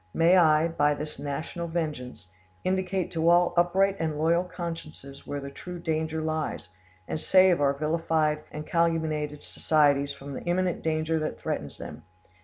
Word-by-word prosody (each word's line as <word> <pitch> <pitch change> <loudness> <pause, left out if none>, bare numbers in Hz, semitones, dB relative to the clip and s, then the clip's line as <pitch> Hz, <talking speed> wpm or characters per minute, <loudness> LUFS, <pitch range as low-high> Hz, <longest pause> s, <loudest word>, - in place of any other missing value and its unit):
May 170 +3 +5
I, 160 -2 +5
by 150 -3 +1
this 150 -1 -7
national 155 +4 -4
vengeance, 135 - -4 0.3
indicate 185 0 -1
to 165 0 +2
all 175 0 +4
upright 190 +3 +3
and 155 -2 -1
loyal 165 +3 +2
consciences 165 -6 -8
where 145 - -3
the 140 0 -7
true 180 +5 -8
danger 160 -1 -2
lies, 155 - -3 0.4
and 155 - -3
save 185 -4 +5
our 140 -1 +3
vilified 155 +1 0
and 150 0 -6
calumniated 155 -3 0
societies 145 -2 +2
from 140 0 -9
the - - -6
imminent 180 0 0
danger 160 0 0
that 155 - -4
threatens - - -4
them! - - -8
160 Hz, 155 wpm, -27 LUFS, 150-170 Hz, 0.4 s, May